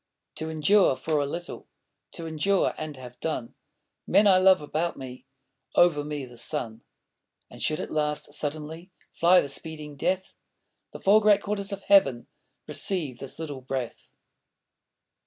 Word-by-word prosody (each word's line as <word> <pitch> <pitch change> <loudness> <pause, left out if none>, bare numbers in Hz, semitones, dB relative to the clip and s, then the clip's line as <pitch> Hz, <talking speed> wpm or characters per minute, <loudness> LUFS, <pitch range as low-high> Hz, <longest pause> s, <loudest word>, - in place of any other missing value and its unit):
To 160 0 -4
endure 160 +1 +4
for 155 +2 -1
a 140 - 0
little, 175 +4 -6 0.5
To 165 - -5
endure 165 +5 +1
and 155 -2 -6
have 125 -1 -11
done: 150 -7 -3 0.5
Men 210 - +5
I 190 -2 +6
love 190 0 +6
about 155 +3 -2
me, 130 -1 -9 0.5
Over 165 -4 +4
me 145 -2 -4
the 120 -1 -14
sun! 120 -4 -3 0.7
And - - -11
should 155 - 0
at - - -5
last 150 -1 -1
suddenly 155 +4 -5 0.2
Fly 180 +2 +5
the - - -4
speeding 150 +1 -4
death, 185 +6 -1 0.6
The - - -9
four 210 +3 +5
great 205 -1 +4
quarters 200 -1 -2
of 200 0 -6
heaven 135 -12 +4 0.4
Receive 155 -11 -1
this 135 - -6
little 145 -5 -6
breath. 130 -2 -5
155 Hz, 150 wpm, -26 LUFS, 140-185 Hz, 0.7 s, I